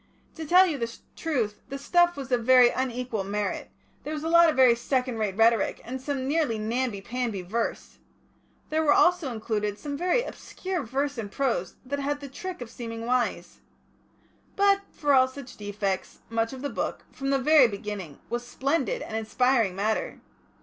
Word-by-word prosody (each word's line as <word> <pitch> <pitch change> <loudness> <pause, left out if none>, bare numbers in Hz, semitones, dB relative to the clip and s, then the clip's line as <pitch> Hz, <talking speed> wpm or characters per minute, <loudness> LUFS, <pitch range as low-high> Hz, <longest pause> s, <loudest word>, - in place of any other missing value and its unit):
To 320 - -7
tell 365 +4 +7
you 310 -6 -2
the 230 -1 -2 0.2
truth, 235 -10 -2
the 275 - -4
stuff 350 +4 +3
was 270 -2 -6
of 245 -2 +2
very 250 0 +7
unequal 250 -4 -2
merit; 205 +1 -3 0.3
there 305 - -4
was 300 - -5
a 325 - -1
lot 335 0 +7
of 310 - 0
very 255 -2 +6
second 250 0 -1
rate 205 -3 -1
rhetoric, 225 -1 +3
and 260 +2 -5
some 265 -1 -3
nearly 290 -6 +1
namby 225 -1 -2
pamby 230 -3 -3
verse. 225 +6 -3 0.7
There 315 +1 +2
was 295 -2 +4
also 350 -6 +3
included 210 -2 -2
some 285 +3 -5
very 365 +10 +1
obscure 375 -7 -5
verse 275 +2 -2
and 205 -3 -5
prose 235 -10 -1
that 285 +2 -3
had 285 +1 -1
the 280 -1 -8
trick 365 +4 -7
of 240 - -7
seeming 230 -1 -6
wise. 235 -8 -1 1.0
But 400 0 +4
for 290 -2 +1
all 260 -1 +6
such 260 -1 -10
defects, 205 -2 -3
much 225 0 0
of 265 0 -8
the 285 - -1
Book, - - -3
from 275 0 -4
the 275 - +3
very 280 0 +6
beginning, 200 -7 -6
was 240 +1 -3
splendid 280 - -1
and 220 - -6
inspiring 225 -2 +1
matter. 215 +3 -1
255 Hz, 180 wpm, -27 LUFS, 225-285 Hz, 1.0 s, tell